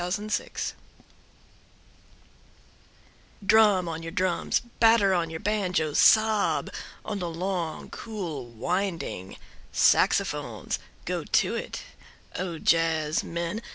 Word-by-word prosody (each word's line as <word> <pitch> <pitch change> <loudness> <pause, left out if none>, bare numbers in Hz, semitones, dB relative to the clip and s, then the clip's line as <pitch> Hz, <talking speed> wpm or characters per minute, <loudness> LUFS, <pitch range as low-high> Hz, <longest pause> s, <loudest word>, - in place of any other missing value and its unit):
Jazz 180 +2 -1
Fantasia 210 0 -3 2.7
DRUM 205 -4 +5
on 165 0 -4
your 165 0 -6
drums, 185 0 0 0.2
batter 225 -4 +5
on 170 -2 0
your 160 0 -5
banjoes, 185 -7 0
sob 220 -1 +4 0.3
on 210 -2 -3
the 175 -2 -3
long 170 -1 -3
cool 175 - -5
winding 165 - -3 0.3
saxophones. - - +2 0.3
Go - - -2
to - - +2
it, - - -5 0.5
O 175 -3 -3
jazzmen. 165 +4 0
180 Hz, 95 wpm, -27 LUFS, 165-205 Hz, 2.7 s, DRUM